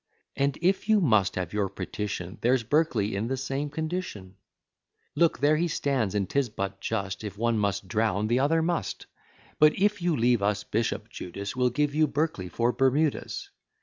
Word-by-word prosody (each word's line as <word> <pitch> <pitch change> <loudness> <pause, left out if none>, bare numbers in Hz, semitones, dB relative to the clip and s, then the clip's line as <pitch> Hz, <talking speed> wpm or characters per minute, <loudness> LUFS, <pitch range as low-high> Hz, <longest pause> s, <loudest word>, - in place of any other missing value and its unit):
And 140 +1 0
if 190 +4 +1
you 215 -1 +6
must 110 - +3
have 90 -1 -3
your 100 -2 0
petition, 100 -2 -5
There's 125 +1 +2
Berkeley 115 -6 +1
in 105 +3 -1
the 135 +2 -2
same 135 +3 -3
condition; 155 - -4 0.8
Look, 170 -1 +3
there 145 +4 +3
he 175 +2 +1
stands, 135 - -1
and 100 -2 0
'tis 140 +1 0
but 100 -2 -4
just, 100 -3 -3
If 105 -1 -6
one 115 0 +1
must 100 -1 -1
drown, 105 +1 0
the 120 +3 +2
other 160 +4 +2
must; 170 0 -2 0.5
But, 150 0 +5
if 205 0 +2
you'll 170 -3 +1
leave 120 -1 +3
us 105 +1 0
Bishop 115 +2 -2
Judas, 100 +4 -6
We'll 125 -1 +2
give 145 +3 0
you 155 +1 +3
Berkeley 145 - -2
for 120 +7 +1
Bermudas. 135 +4 0
120 Hz, 180 wpm, -27 LUFS, 100-150 Hz, 0.8 s, you